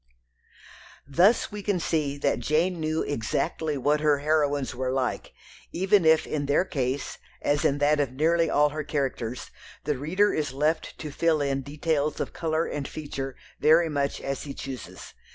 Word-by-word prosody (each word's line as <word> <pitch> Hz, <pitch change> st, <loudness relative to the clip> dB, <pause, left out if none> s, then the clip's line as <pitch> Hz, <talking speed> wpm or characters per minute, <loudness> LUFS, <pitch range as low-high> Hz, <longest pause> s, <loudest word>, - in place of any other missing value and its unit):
Thus 180 Hz, -, +3 dB
we 210 Hz, 0 st, -6 dB
can 200 Hz, -2 st, 0 dB
see 150 Hz, -4 st, -1 dB
that 140 Hz, -, 0 dB
Jane 170 Hz, +4 st, +1 dB
knew 155 Hz, 0 st, 0 dB
exactly 145 Hz, +4 st, -2 dB
what 145 Hz, +3 st, +2 dB
her 150 Hz, -1 st, +3 dB
heroines 145 Hz, -2 st, +1 dB
were 130 Hz, +1 st, -2 dB
like, 130 Hz, -1 st, -2 dB, 0.4 s
even 190 Hz, 0 st, +3 dB
if 160 Hz, 0 st, +5 dB
in 145 Hz, -2 st, -2 dB
their 145 Hz, +6 st, +3 dB
case, 135 Hz, -3 st, -3 dB, 0.2 s
as 145 Hz, +1 st, 0 dB
in 140 Hz, -, +2 dB
that 145 Hz, +1 st, +3 dB
of 140 Hz, -4 st, 0 dB
nearly 165 Hz, +4 st, +2 dB
all 150 Hz, 0 st, +4 dB
her 155 Hz, +1 st, -4 dB
characters, 130 Hz, -5 st, -3 dB, 0.3 s
the 145 Hz, -4 st, -1 dB
reader 185 Hz, +9 st, +2 dB
is 150 Hz, -3 st, -2 dB
left 150 Hz, +4 st, -1 dB
to 155 Hz, -2 st, -6 dB
fill 160 Hz, +1 st, +2 dB
in 140 Hz, -1 st, 0 dB
details 150 Hz, +1 st, -1 dB
of -, -, -3 dB
colour 160 Hz, 0 st, 0 dB
and 145 Hz, -2 st, -4 dB
feature 140 Hz, -3 st, -5 dB, 0.2 s
very 160 Hz, +2 st, +5 dB
much 140 Hz, -2 st, -1 dB
as 135 Hz, 0 st, -4 dB
he 140 Hz, -2 st, -7 dB
chooses. 130 Hz, -3 st, -8 dB
150 Hz, 170 wpm, -26 LUFS, 140-160 Hz, 0.4 s, if